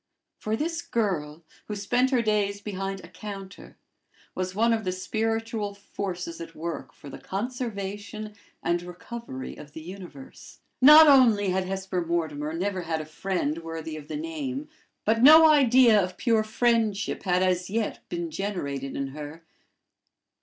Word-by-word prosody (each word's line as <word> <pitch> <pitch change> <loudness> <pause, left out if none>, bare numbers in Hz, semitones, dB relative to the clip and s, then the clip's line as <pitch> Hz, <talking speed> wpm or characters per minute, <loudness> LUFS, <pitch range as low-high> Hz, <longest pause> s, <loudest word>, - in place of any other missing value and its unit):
For 215 +1 -1
this 330 +6 -2
girl, 175 - -2 0.2
who 210 - -4
spent 245 +6 +1
her 250 -3 +2
days 205 -2 +1
behind 195 -1 -4
a - - -10
counter, 200 -2 -9 0.6
was 185 0 -3
one 230 +2 +3
of 220 -1 -1
the 185 - -1
spiritual 220 +2 -2
forces 185 -4 -5
at 165 0 -9
work 155 -5 -5
for - - -14
the 140 - -9
conservation 210 -2 -5 0.3
and 170 0 +1
recovery 180 - -8
of 145 -1 -12
the 160 - -8
universe. 190 - -11 0.2
Not 305 +4 +10
only 235 -8 +6
had 185 0 0
Hesper 190 -1 -2
Mortimer 160 -3 -2
never 185 +3 -2
had 165 -2 -2
a 155 - -5
friend 155 -1 -2
worthy 165 -1 -6
of 150 -1 -9
the - - -4
name, 300 -3 -4 0.4
but 225 +1 +2
no 315 +4 +9
idea 255 -7 +6
of 180 0 -5
pure 225 -3 +2
friendship 220 -2 0
had 180 -2 +1
as 180 0 0
yet 220 +1 -2
been 170 -1 -4
generated 140 -8 -4
in 140 -1 -3
her. 150 +3 -9
195 Hz, 155 wpm, -26 LUFS, 170-225 Hz, 0.6 s, Not